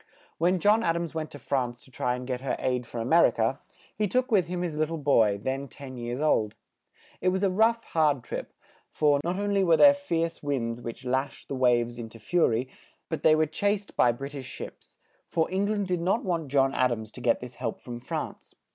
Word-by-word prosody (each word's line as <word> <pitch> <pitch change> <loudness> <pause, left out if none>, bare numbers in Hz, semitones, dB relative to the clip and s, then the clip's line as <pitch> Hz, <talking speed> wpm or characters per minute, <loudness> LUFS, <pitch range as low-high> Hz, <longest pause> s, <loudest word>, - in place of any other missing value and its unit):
When 180 +3 +3
John 210 +4 +4
Ad 165 -5 +1
ams 170 -2 -3
went 160 -1 -3
to - - -10
France 125 -4 -2
to 130 - -19
try 125 0 -1
and 125 0 -6
get 125 -1 -3
her 135 - -1
aid 125 -2 -1
for 120 - -8
A 115 - -2
mer 165 +6 +6
i - - +2
ca, 115 +3 -1 0.4
he 210 0 0
took 255 +6 0
with 190 -6 +3
him 180 0 -3
his 165 -4 -3
lit 155 0 +1
tle 165 +1 -4
boy, 115 -9 +3
then 135 +5 -3
ten 135 0 -10
years 120 +1 -4
old. 110 -9 +1 0.7
It 185 - 0
was 190 +2 -1
a 195 - +3
rough, 225 +4 +3
hard 150 -6 +1
trip; - - -6 0.4
for, 145 -2 +2
not 175 +2 -1
on 205 0 -1
ly 200 - +3
were 170 -4 +4
there 285 -1 +8
fierce 170 -13 -2
winds 120 -5 -2
which 120 +2 -7
lashed 130 +2 -2
the - - -3
waves 120 -2 +2
in 115 -1 -6
to 115 - -13
fu 170 +10 +2
ry, 115 +2 0 0.4
but 160 - -3
they 155 - +6
were 155 0 +3
chased 200 +6 -2
by 120 - +5
Brit 135 +4 -7
ish 135 -3 -7
ships, - - -10 0.3
for 160 - +1
Eng 195 +2 +1
land 205 -2 -1
did 180 -2 -1
not 190 +7 +1
want 170 -5 -1
John 135 0 +2
Ad 130 -2 +2
ams 110 -2 -4
to - - -11
get 120 - +2
this 125 0 -8
help 115 - -2
from 120 -1 -7
France. - - -6
145 Hz, 240 wpm, -27 LUFS, 125-180 Hz, 0.7 s, there